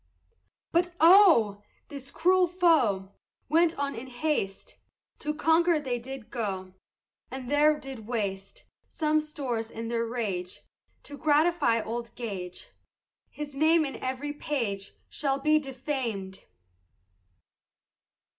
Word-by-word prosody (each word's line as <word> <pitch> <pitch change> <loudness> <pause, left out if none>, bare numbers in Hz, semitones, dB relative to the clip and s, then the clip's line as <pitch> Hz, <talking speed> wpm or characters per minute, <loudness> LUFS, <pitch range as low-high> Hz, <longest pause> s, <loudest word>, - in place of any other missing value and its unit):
But 345 +1 +1
oh! 325 - +6 0.3
this 275 -2 -8
cruel 365 +4 +3
foe 295 - +2 0.4
Went 330 +2 +3
on 280 0 -1
in 235 +3 -7
haste, 245 -6 -3 0.4
To 300 - -2
Concord 325 +1 +2
they 245 -3 -2
did 260 -1 -9
go, 190 -6 -4 0.6
And 260 -1 -6
there 300 +1 +4
did 265 -6 -9
waste 200 -5 -4 0.2
Some 310 -1 +1
stores 260 -7 -4
in 230 0 -6
their 230 0 -1
rage, 200 -7 -3 0.4
To 285 -1 -10
gratify 300 -6 +3
old 235 0 -5
Gage, 190 -7 -6 0.6
His 295 -1 -7
name 315 +3 +3
in 275 - -5
every 265 +3 -4
page 225 -10 -3
Shall 275 -2 -1
be 305 +2 +3
defam'd. 255 -8 -4
270 Hz, 115 wpm, -28 LUFS, 225-305 Hz, 0.6 s, oh